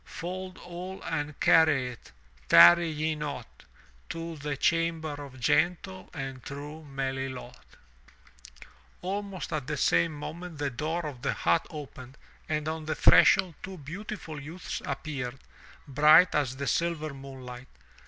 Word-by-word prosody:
Fold 185 +1 -6
all 180 +2 -7
and 150 -2 -3
carry 155 -6 +5
it, 120 - -12 0.4
tarry 85 - +8
ye 155 0 -1
not, 145 -6 -7 0.4
To 165 0 -5
the 145 -1 -4
chamber 165 0 +1
of 140 -2 -9
gentle 180 +7 0
and 135 -4 -6
true 145 +4 -8
Melilot, 135 -3 -4 1.5
Almost 195 0 -4
at 145 -4 -3
the 150 -1 -2
same 85 - +3
moment 165 +3 -7
the 145 -1 -2
door 160 +6 -2
of 135 -5 -6
the 135 - 0
hut 165 - +1
opened 135 -3 -9 0.3
and 150 -1 -1
on 160 0 -3
the 155 - -2
threshold 180 -3 +6
two 190 0 -7
beautiful 165 0 -7
youths 160 +4 -6
appeared, 135 -3 -4 0.5
bright 150 +6 +6
as 135 -4 0
the 140 - -3
silver 155 -1 -1
moonlight. 130 -2 -9
150 Hz, 135 wpm, -28 LUFS, 135-165 Hz, 1.5 s, tarry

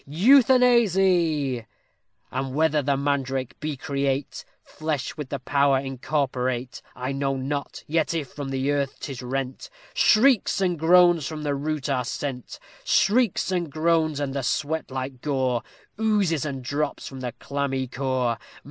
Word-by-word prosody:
Euthanasy!_ 190 - +4 0.7
And 130 0 -3
whether 155 -1 +2
the 140 0 +1
mandrake 135 -2 -2
be 150 -2 -3
create 140 0 -2 0.2
Flesh 155 -4 -4
with 150 -4 -6
the 140 - -2
power 140 +1 +2
incorporate, 130 -2 -2
I 130 +2 -3
know 135 0 -1
not; 140 +2 -4
yet, 160 +2 0
if 150 -5 -3
from 145 -2 -6
the 135 +1 0
earth 140 -2 -1
'tis 135 -3 -6
rent, 130 +1 -4 0.2
Shrieks 240 -1 +4
and 180 -4 0
groans 175 -1 +5
from 155 -1 -6
the 145 -1 0
root 150 0 -2
are 130 -3 0
sent; 125 +1 -5 0.3
Shrieks 220 -3 +2
and 175 -5 -1
groans, 155 -1 +1
and 140 -1 -3
a 140 - -1
sweat 155 +5 -1
like 130 -1 -5
gore 130 -4 0 0.4
Oozes 200 -9 +1
and 135 -3 -4
drops 145 +3 -2
from 135 - -8
the 125 -2 -4
clammy 140 -2 -2
core. 125 -2 -1
140 Hz, 145 wpm, -25 LUFS, 130-160 Hz, 0.7 s, groans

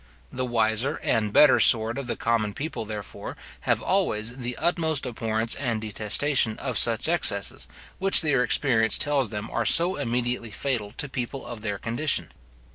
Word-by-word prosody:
The 130 0 -3
wiser 115 +4 0
and 105 -2 0
better 150 +5 +6
sort 115 +2 +5
of 135 - -6
the - - -2
common 110 -3 -1
people, 135 -6 -5
therefore, 105 -2 -7 0.3
have - - +2
always 110 +4 0
the 125 0 -4
utmost 160 -4 0
abhorrence 115 -1 -1
and 120 -5 -2
detestation 110 +3 0
of - - -1
such - - +2
excesses, 60 - 0 0.3
which 195 +1 +6
their 150 -6 +1
experience 120 -3 +2
tells 140 -5 0
them 105 0 -6
are - - -1
so 175 +3 +3
immediately 120 -3 -2
fatal 110 -1 -3
to 145 - -1
people 130 0 -5
of 120 -2 -8
their 105 -2 -3
condition. 120 +9 -1
120 Hz, 160 wpm, -25 LUFS, 110-140 Hz, 0.3 s, better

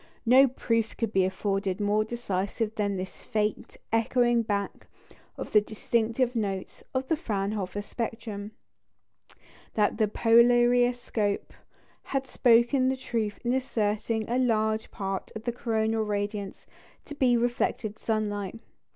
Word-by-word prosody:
No 260 +4 +7
proof 230 -3 -1
could 225 -2 -2
be 190 -1 +4
afforded 195 0 -1
more 210 +1 +2
decisive 215 -1 -2
that 205 -3 -1
this 185 +1 -6
faint 215 -1 -2 0.2
echoing 240 +1 +3
back 205 -3 -3 0.5
of - - -6
the 210 - +6
distinctive 230 +3 0
notes 195 -4 -3
of 260 0 -2
the 320 - +2
Fraunhofer 205 - -3
spectrum, 220 -2 -5 1.3
that 210 0 +2
the 215 - +4
polariscope 240 -1 +3 0.5
had 270 -1 -2
spoken 245 +1 +4
the 265 - -1
truth 225 -5 -2
in 240 - +2
asserting 220 -3 -1
a 245 +2 0
large 220 -3 +1
part 195 -2 -4
of 220 - -6
the 240 - -1
coronal 225 -2 0
radiance 205 -1 -3 0.4
to 295 - -8
be 255 -4 +3
reflected 235 -3 -1
sunlight. 210 -2 -2
220 Hz, 125 wpm, -27 LUFS, 205-240 Hz, 1.3 s, No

